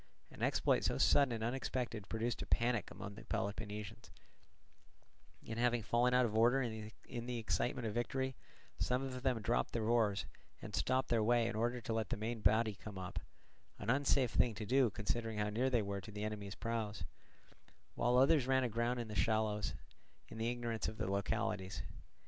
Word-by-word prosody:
An - - -12
exploit - - +2
so - - +1
sudden 140 -3 +5
and 115 -1 -2
unexpected 120 -4 -2
produced 115 +1 -1
a - - -5
panic 120 +1 +1
among 100 0 -7
the 110 - -11
Peloponnesians; 105 0 -4 1.4
and 110 +1 -4
having 120 -1 +2
fallen 120 +3 +3
out 125 0 +5
of 110 -2 -2
order 120 +4 +5
in 110 0 -5
the 125 -1 -2
excitement 120 +2 -1
of 110 - -2
victory, 130 +3 -1 0.4
some 125 +1 +1
of 130 -1 -4
them 125 -4 0
dropped 115 - +1
their 115 - 0
oars 110 -4 +2 0.3
and - - -8
stopped 130 0 +1
their 115 -2 +3
way 120 +1 +3
in 115 -1 -2
order 120 +3 0
to 115 - -3
let 110 -3 -1
the - - -1
main 115 +2 -3
body 110 +2 +4
come 100 0 -9
up—an 95 +3 -6
unsafe 135 -2 +3
thing 115 -3 +3
to 105 +1 -4
do 130 +2 +4
considering 110 +2 -2
how 105 0 0
near 125 +5 +1
they 120 -4 +2
were 100 0 -3
to 100 - -10
the 105 0 -5
enemy's 105 -2 -4
prows; 115 -3 -3 0.9
while 120 +1 +2
others 135 0 +5
ran 130 0 +3
aground 120 +1 0
in 120 - -3
the 110 - -6
shallows, 110 -1 +1 0.5
in 110 - -8
their 115 +1 +1
ignorance 120 -2 -2
of 110 - -5
the - - -1
localities. 95 0 -1
115 Hz, 185 wpm, -36 LUFS, 105-125 Hz, 1.4 s, sudden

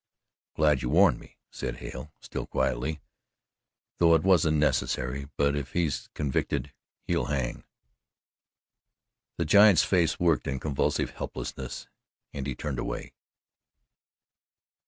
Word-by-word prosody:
"I'm - - -5
glad 75 -4 +4
you 60 - -2
warned - - +5
me," - - -17
said - - -4
Hale 65 +4 -8
still - - -6
quietly, 75 +5 -1 1.0
"though 85 -1 +6
it 80 - +2
wasn't 80 -5 +4
necessary. 70 -2 0
But 70 0 +2
if 70 -3 -5
he's 80 -6 -1
convicted, 70 -1 -2 0.3
he'll - - 0
hang." 65 -4 -2 1.7
The 85 - 0
giant's 100 0 +7
face 85 -4 +1
worked 85 -3 +2
in 70 -1 -2
convulsive 70 -2 -1
helplessness 65 -1 -6 0.5
and 70 -2 -4
he 70 - -3
turned 70 -2 -4
away. - - -5
75 Hz, 120 wpm, -28 LUFS, 65-80 Hz, 1.7 s, giant's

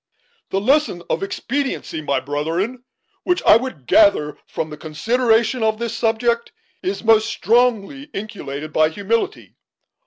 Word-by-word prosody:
"The 195 - 0
lesson 260 - +1
of - - 0
expediency, 240 - -3
my 140 -3 0
brethren, 165 - -3 0.4
which 360 0 0
I - - +7
would 230 - -2
gather 150 - +3
from 155 - -4
the - - -6
consideration 230 +9 +1
of 220 -1 +1
this 235 0 -3
subject, 235 +1 0 0.3
is 195 +3 -3
most 220 -1 +4
strongly 240 +3 +1
inculcated 155 - -7
by 155 0 +4
humility. 225 - -2
220 Hz, 130 wpm, -20 LUFS, 160-240 Hz, 0.4 s, I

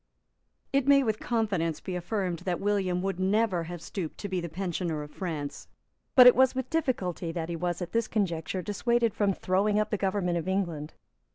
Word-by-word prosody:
It 275 -1 +2
may 280 -1 +6
with 220 -3 -1
confidence 195 -9 -1
be 185 - -5
affirmed 180 -1 -2
that 180 0 -2
William 195 -3 0
would 195 -1 -2
never 190 -2 +1
have 175 0 -7
stooped 165 -1 -5
to 205 - -3
be 185 -2 -2
the 170 - -5
pensioner 170 -3 -3
of 150 - -11
France; 155 -6 -5 0.5
but 250 - +10
it 250 - +9
was 260 0 +4
with 260 -1 -3
difficulty 190 - -1
that 165 -1 -4
he 170 - -2
was, 175 +1 -2
at 175 - -7
this 230 -1 +1
conjuncture, 180 -3 -1
dissuaded 230 +3 +1
from 205 -2 +2
throwing 200 +3 +1
up 215 - -1
the 210 - +1
government 190 -3 0
of 165 - -6
England. 170 -6 -2
185 Hz, 195 wpm, -28 LUFS, 170-215 Hz, 0.5 s, but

